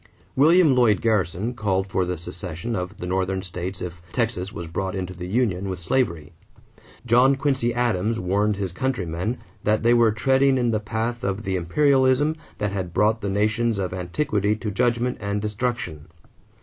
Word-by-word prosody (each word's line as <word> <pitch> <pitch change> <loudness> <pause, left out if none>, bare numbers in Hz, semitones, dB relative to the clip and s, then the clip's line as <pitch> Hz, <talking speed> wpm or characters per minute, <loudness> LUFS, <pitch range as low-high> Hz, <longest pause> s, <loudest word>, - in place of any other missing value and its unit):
William 160 +2 +5
Lloyd 115 -6 +4
Garrison 105 0 0
called 100 -5 0
for 95 -1 0
the 90 0 -3
secession 90 +6 -5
of 90 +2 -4
the - - -6
Northern 95 +1 -1
states 90 +1 -5
if 85 -1 -7
Texas 110 -6 -1
was 85 - -6
brought 95 +4 -3
into 90 -1 -4
the 90 0 -7
union 100 -3 0
with 95 -1 -4
slavery. 85 - -1 0.7
John 125 +3 +5
Quincy 135 -3 0
Adams 115 -2 0
warned 100 +3 +1
his 95 -2 -3
countrymen 95 -1 -2 0.3
that 110 +1 +1
they 120 +1 +5
were 120 -2 +5
treading 135 +4 +3
in 120 -2 +1
the 110 - +1
path 115 +4 -3
of 100 +1 -2
the 95 -3 -1
imperialism 135 - +3 0.2
that 105 -1 -1
had 95 -3 -4
brought 110 +2 +2
the 100 - -2
nations 110 +3 +1
of 95 -2 -2
antiquity 100 - 0
to 110 -1 -4
judgment 120 +3 0
and 100 0 -1
destruction. 105 -7 -3
105 Hz, 170 wpm, -24 LUFS, 90-120 Hz, 0.7 s, William